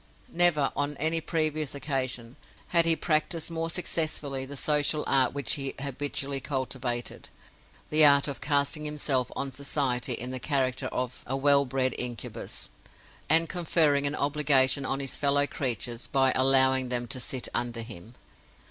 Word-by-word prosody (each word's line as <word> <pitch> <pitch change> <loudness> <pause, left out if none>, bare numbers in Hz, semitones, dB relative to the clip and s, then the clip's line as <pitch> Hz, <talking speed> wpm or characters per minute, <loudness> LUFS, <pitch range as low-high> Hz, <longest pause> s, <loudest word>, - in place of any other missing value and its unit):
Never, 165 -5 +4
on 145 0 -2
any 160 +2 +1
previous 155 -3 -2
occasion, 130 -4 -3 0.3
had 170 -1 +3
he 165 -1 +4
practiced 160 +1 -1
more 165 0 -3
successfully 155 -6 -1
the 140 +1 -8
social 150 +1 +1
art 130 -2 +2
which 140 -4 -1
he 135 -1 -3
habitually 140 0 -2
cultivated—the 130 +3 -2
art 140 -1 +7
of 140 - -6
casting 145 +1 +1
himself 145 -4 -1
on 135 - -3
society 135 -1 -1
in 125 +2 -3
the 130 - -4
character 130 -2 -1
of 125 0 -5
a 135 - -2
well 140 0 +4
bred 130 0 -1
Incubus, 120 -2 -4 0.6
and 165 +2 +4
conferring 155 -5 +1
an 140 - -2
obligation 140 -2 +2
on 135 - -2
his 135 -2 -3
fellow 145 0 +2
creatures 120 -4 -3
by 135 -1 +2
allowing 130 -1 +4
them 120 -1 0
to 130 +2 -3
sit 125 0 -2
under 120 -1 -3
him. 115 0 -12
140 Hz, 150 wpm, -27 LUFS, 130-150 Hz, 0.6 s, art